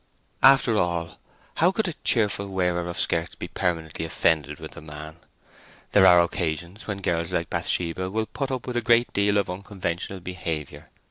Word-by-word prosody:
After 135 -4 +6
all, 85 -3 -1 0.4
how 175 +3 +4
could 220 +1 -1
a 175 - -3
cheerful 105 -3 +3
wearer 90 -2 -1
of 85 - -5
skirts 85 0 -1
be - - -6
permanently 80 -3 -2
offended 80 -2 0
with - - -8
the - - -11
man? 75 +1 -9 0.7
There 95 -2 +6
are 90 -1 +7
occasions 85 +3 -3
when 100 -2 -4
girls 85 0 -1
like 85 -2 -2
Bathsheba 90 +2 -1
will 110 +3 -1
put 135 +4 -4
up 130 -2 -3
with 125 -1 -3
a - - +1
great 120 +1 +3
deal 100 0 +2
of 100 - +1
unconventional 95 -1 -4
behaviour. 80 -4 -5
90 Hz, 175 wpm, -25 LUFS, 85-105 Hz, 0.7 s, are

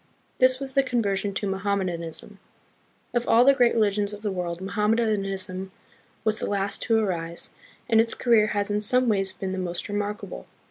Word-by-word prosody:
This 255 0 +5
was 270 -1 -3
the 275 - +4
conversion 205 -6 -1
to 205 - -1
Mohammedanism. 190 -1 -3 0.7
Of 240 -1 0
all 235 +2 +5
the 275 - +7
great 245 -3 +3
religions 205 -2 +1
of 210 +1 -9
the 205 - -1
world, 175 -2 -3
Mohammedanism 195 -2 -1 0.5
was 215 -1 +1
the - - -2
last 200 0 -1
to 225 -2 +2
arise, 170 -6 -2 0.4
and 225 -2 +5
its 230 0 -2
career 230 -3 +3
has 205 0 -1
in 205 0 0
some 250 +4 +4
ways 195 -3 +1
been 190 0 -5
the 190 - -3
most 175 -1 -3
re 205 - -6
markable. 205 - -4
205 Hz, 180 wpm, -25 LUFS, 190-225 Hz, 0.7 s, the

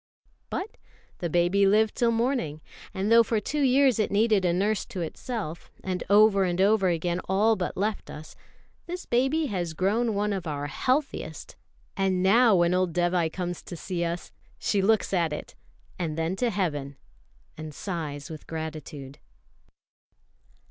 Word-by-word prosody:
But 395 +4 -5 0.4
the 170 - -2
baby 175 +4 +3
lived 215 +2 +3
till 235 - +2
morning; 230 - -1 0.3
and 195 +3 -2
though 230 0 +8
for 225 -1 0
two 295 +7 -2
years 265 -3 +4
it 215 - +1
needed 210 -2 +2
a 175 - +3
nurse 200 +4 +1
to 195 -7 -5
itself, 170 0 -5
and 185 -1 -2
over 205 -1 +6
and 175 -1 -1
over 200 0 +4
again 175 0 0
all 210 +4 +3
but 180 -3 -4
left 210 +2 -2
us, 155 +1 -10 0.5
this 355 +1 -5
baby 270 +6 +1
has 175 - -3
grown 215 +5 +1
one 205 +1 0
of 185 -3 -4
our 145 -1 -3
healthiest; 260 - -2 0.4
and 190 -2 +1
now 225 +3 +5
when 175 0 +3
old 180 -2 +1
Dévai 175 -1 +1
comes 175 -1 -4
to 175 - -8
see 175 0 -3
us 170 +1 -4 0.3
she 200 - 0
looks 215 +1 +2
at 170 -4 +2
it, 150 - -6 0.5
and 160 -3 -2
then 165 +3 -1
to 245 +2 +1
Heaven, 145 -9 -2 0.6
and 155 0 -7
sighs 150 -3 -5
with 155 - -9
gratitude. 155 -3 -7
190 Hz, 160 wpm, -27 LUFS, 170-220 Hz, 0.6 s, though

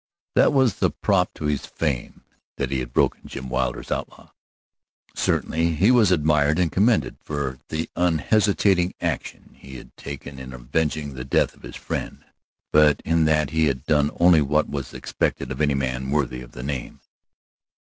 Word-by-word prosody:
That - - +5
was 130 -6 +2
the - - +3
prop - - +1
to - - -6
his 75 -2 -1
fame 70 -7 -3 0.3
that 70 -2 -2
he 65 - 0
had 60 -1 -5
broken - - +1
Jim 65 -1 -7
Wilder's 65 -1 -2
outlaw. - - -5 0.8
Certainly 80 0 0
he 100 +10 +4
was 115 -7 +5
admired 75 -2 +3
and 90 -3 +1
commended 110 +6 +2
for 70 -3 -4
the 80 +1 -2
unhesitating 90 +2 +2
action - - -4
he 65 -1 -11
had - - -12
taken 70 -1 -8
in 65 0 -8
avenging 70 +4 -2
the 65 -1 -6
death 65 - +1
of - - -22
his - - -10
friend, - - -5 0.5
but 75 -1 +5
in 80 -1 +2
that 75 0 +2
he 80 0 +2
had 65 0 -2
done 75 -2 +3
only 85 -3 +6
what 75 +2 +1
was 70 -3 -5
expected 65 - -2
of 65 - -4
any 70 -2 +2
man 65 -1 -2
worthy 70 -3 -1
the - - -10
name. 70 -3 -5
75 Hz, 170 wpm, -23 LUFS, 65-80 Hz, 0.8 s, only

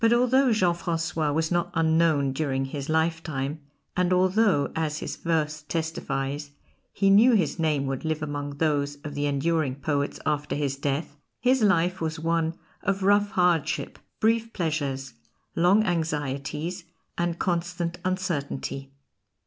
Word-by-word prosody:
But 230 +1 +6
although 250 +2 +4
Jean 185 -6 +3
Francois 165 -3 -1
was 160 +2 0
not 175 -1 +1
unknown 160 -4 +3
during 135 -2 -1
his 140 +1 -5
lifetime, 160 -3 -1 0.4
and 180 0 +1
although, 185 -3 +3
as 155 -2 -1
his - - -4
verse 155 -2 -1
testifies, 150 -3 -3 0.4
he 195 -1 +2
knew 225 +6 +7
his 175 -6 +1
name 150 -4 +1
would 135 -1 -3
live 155 -1 -1
among 145 -1 -4
those 145 -2 +1
of 150 -2 -6
the 145 0 -1
enduring 145 -1 0
poets 140 0 -2
after 145 -1 -1
his 140 -2 -1
death, 145 +2 -3 0.2
his 255 +1 +3
life 180 -3 +2
was 160 0 -2
one 165 0 0 0.3
of 195 0 -1
rough 205 +1 +4
hardship, 175 -5 +1 0.2
brief 225 +1 +1
pleasures, 145 -6 -2 0.4
long 180 +6 +4
anxieties, 155 0 -2 0.3
and 170 0 -1
constant 175 -1 -2
uncertainty. 150 -7 -2
160 Hz, 140 wpm, -26 LUFS, 145-180 Hz, 0.4 s, knew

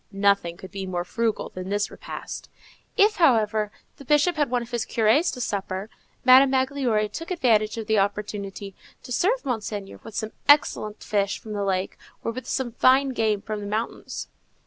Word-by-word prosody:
Nothing 195 -4 +2
could 190 0 -11
be 195 -1 -5
more 175 -1 -2
frugal 225 +4 -1
than 185 +1 -7
this 205 0 0
repast. - - -8 0.5
If, 425 +1 +4
however, 220 - +3 0.3
the - - -11
Bishop 295 +6 +3
had 295 -4 +1
one 245 -1 0
of 235 - -13
his 240 -2 -1
curés 230 +10 +2
to - - -8
supper, 200 -2 -3 0.3
Madame 260 +1 +8
Magloire 260 -5 +1
took 325 +11 -7
advantage 230 - +2
of 225 - -4
the 220 -1 +2
opportunity 200 -1 -3 0.3
to 250 - -10
serve 420 - +1
Monseigneur 210 -5 -4
with 225 -2 -10
some 220 -1 -3 0.2
excellent 220 -7 +3
fish 200 -2 0
from 215 - -8
the 205 -1 -2
lake, 190 -1 -1 0.2
or - - -1
with 255 +2 -7
some 260 -3 -2
fine 265 +4 +4
game 220 -5 0
from 215 -1 -4
the 205 - -6
mountains. 220 +3 -4
220 Hz, 180 wpm, -25 LUFS, 200-255 Hz, 0.5 s, Madame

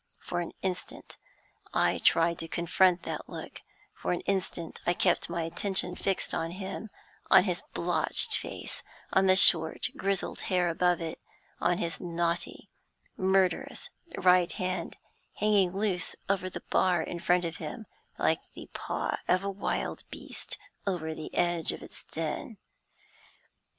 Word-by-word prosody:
For 175 - -3
an 170 - -5
instant 185 -1 -4 0.6
I - - +3
tried 165 0 +3
to 165 - -5
confront 175 +2 +3
that - - -5
look; - - -8 0.3
for - - -3
an 175 - -2
instant 185 -4 -2
I 175 - +1
kept - - +2
my 170 -1 -1
attention 180 +2 0
fixed 195 0 -1
on 165 - -1
him 190 +4 -6 0.4
on - - +8
his 180 -3 -1
blotched 180 - +3
face - - -4 0.3
on 190 0 +4
the 185 - +6
short, 160 -4 +6
grizzled 195 -1 -1
hair 180 -2 +2
above 175 +1 +2
it 160 -1 -4 0.4
on 175 0 +2
his 170 -2 -3
knotty, 170 -1 -2 0.5
murderous 190 -1 +1 0.3
right 180 -1 +5
hand, 185 -3 -3 0.4
hanging 205 -3 +3
loose 195 -2 -1
over 190 -2 0
the - - -8
bar 180 -3 +3
in 170 - -5
front 175 +1 +2
of 165 0 -4
him, 195 +8 -6 0.3
like - - +2
the - - -10
paw - - -2
of 185 +2 +3
a 200 - -1
wild 195 +1 -2
beast - - -6 0.3
over 160 -5 -1
the 155 0 -7
edge 175 -2 +2
of - - -8
its - - -12
den. 165 +7 -4
180 Hz, 145 wpm, -29 LUFS, 170-190 Hz, 0.6 s, on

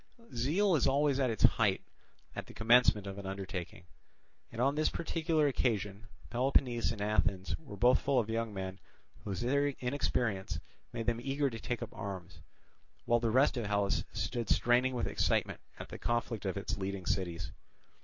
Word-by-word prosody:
Zeal 165 - +2
is 140 - +3
always 140 0 +2
at 130 -2 +2
its 110 - -2
height - - +4 0.5
at - - -5
the - - -13
commencement 115 -2 +4
of 100 0 -6
an 100 - -6
undertaking; 95 -3 -5 0.7
and 115 - -8
on 135 +3 +3
this 155 +1 +2
particular 160 -2 0
occasion 110 -5 -1 0.2
Peloponnese 125 -2 +2
and 110 -3 -6
Athens 100 -3 0
were 135 -11 -10
both 125 +5 +5
full 140 -2 +1
of 115 -4 +2
young 115 0 -1
men 95 -1 -5 0.5
whose 100 +1 -3
inexperience 125 - 0 0.3
made 115 -1 -4
them 120 0 0
eager 140 +1 0
to 115 - -6
take 120 0 -3
up - - -8
arms, 95 -2 -7 0.7
while 120 0 +3
the 115 -1 0
rest 130 +4 +3
of 115 -4 -2
Hellas 100 -1 +1
stood 120 -2 -3
straining 125 +2 +3
with 120 - 0
excitement - - 0 0.2
at - - -8
the - - -8
conflict 120 -3 -1
of 95 - -2
its 100 +1 -3
leading 95 -1 -4
cities. 85 -4 -2
115 Hz, 170 wpm, -32 LUFS, 100-130 Hz, 0.7 s, both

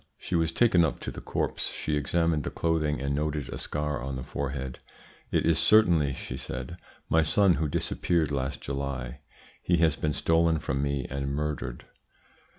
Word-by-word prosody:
"She - - -7
was 80 -2 +2
taken 90 -7 +4
up 80 - 0
to - - -4
the - - -8
corpse; - - -1
she 75 - -2
examined 80 +1 +1
the - - -2
clothing, 75 -4 0
and 70 +1 -1
noted 75 -2 -2
a - - -5
scar 75 -1 -2
on 65 +1 -4
the 65 - -4
forehead. 65 -1 -4 0.5
`It - - +3
is 80 -1 +3
certainly,' 85 -11 +5
she - - -6
said, - - -5 0.3
`my 80 +1 +5
son 95 +4 +4
who 80 - +1
disappeared 80 +1 0
last 65 -1 -2
July. 70 -2 -4 0.4
He 90 - +2
has 80 -2 +3
been 75 -1 -1
stolen 80 +2 +3
from 70 -2 -2
me 70 -2 -1
and 70 +1 -3
murdered.' 75 -5 -3
75 Hz, 175 wpm, -28 LUFS, 70-80 Hz, 0.5 s, certainly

